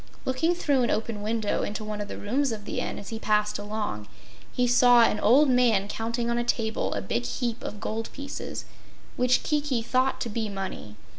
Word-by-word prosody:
Looking 275 +7 +1
through 285 -6 +2
an 240 - +1
open 220 -1 -1
window 215 0 0
into 215 +1 -3
one 210 -1 -4
of 205 - -4
the - - -7
rooms 260 +6 0
of 210 -2 -6
the - - -3
Inn, - - -3
as 200 - -8
he 225 - -5
passed 210 -1 +1
along, 205 - -4 0.4
he 250 - +1
saw 245 -1 +6
an 210 - +2
old 270 +8 +5
man 240 -6 +3
counting 230 +3 -2
on 235 0 +1
a - - 0
table 225 -2 -1
a 100 - -3
big 120 +4 -1
heap 230 - -3
of 210 - -6
gold 220 +2 -4
pieces, 280 0 -6 0.5
which 250 0 +2
Kiki 290 -6 0
thought 255 +2 +1
to 235 - -2
be 220 0 -2
money. 195 - -6
225 Hz, 205 wpm, -27 LUFS, 210-250 Hz, 0.5 s, saw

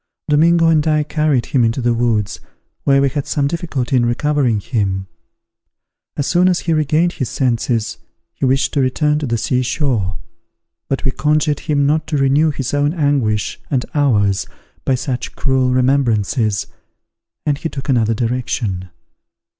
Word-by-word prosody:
Domingo 165 +3 +4
and 160 -1 +3
I 155 -1 +2
carried 150 -4 0
him 130 -4 +1
into 115 +3 +1
the 120 -1 +1
woods, 115 -4 0 0.5
where 135 0 +4
we 140 - +3
had 140 +1 -4
some 145 - 0
difficulty 140 -5 -2
in 125 - +3
recovering 125 -1 +1
him. 95 -4 -2 1.1
As 145 - 0
soon 180 +3 +3
as 180 - +1
he 165 - 0
regained 155 +3 +2
his 130 - -3
senses, 115 -3 -1 0.3
he - - -9
wished 135 +1 +2
to 145 - +1
return 150 +3 +1
to 150 - -3
the 115 -1 0
sea 125 +3 0
shore; 125 - -1 0.7
but 135 - -2
we 135 - +2
conjured 150 +2 +1
him 145 -3 0
not 155 +2 +1
to 155 -2 -1
renew 140 +3 +3
his 135 -3 -3
own 145 +3 +1
anguish 135 - 0
and 130 -3 0
ours 105 -10 +2 0.4
by 135 - +2
such 125 -1 -4
cruel 130 -2 +1
remembrances, 125 -5 +1 0.8
and 145 -1 0
he 165 - -3
took 135 -2 -7
another 115 -4 +2
direction. 115 -5 -2
135 Hz, 160 wpm, -18 LUFS, 120-150 Hz, 1.1 s, Domingo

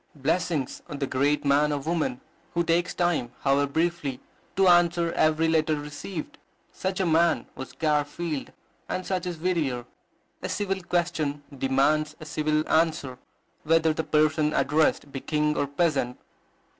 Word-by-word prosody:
Blessings 150 0 -1
on 145 - -5
the 140 - -1
great 140 +3 +1
man 145 +2 +3
or 145 - 0
woman 150 -3 -2 0.3
who 170 - +2
takes 170 +2 +1
time, 175 -9 0
however 140 +1 +2
briefly, 160 -5 -1 0.4
to 195 -1 +4
answer 175 -1 +4
every 155 +1 +3
letter 160 -1 +2
received! 150 +4 -7 0.3
Such 190 0 -3
a 190 - +2
man 165 0 +3
was 130 - -8
Garfield, 150 0 -1 0.4
and 185 - -3
such 185 -2 -2
is 175 -2 -4
Whittier. 155 -8 -1 0.6
A - - -4
civil 195 -2 -1
question 165 -5 -1
demands 140 +4 +1
a 155 - -9
civil 155 0 0
answer, 155 -6 +1 0.4
whether 160 0 +3
the 160 - -2
person 155 0 +2
addressed 150 -1 +2
be 135 - -4
king 150 +1 0
or 145 - 0
peasant. 140 -4 0
155 Hz, 145 wpm, -26 LUFS, 145-170 Hz, 0.6 s, to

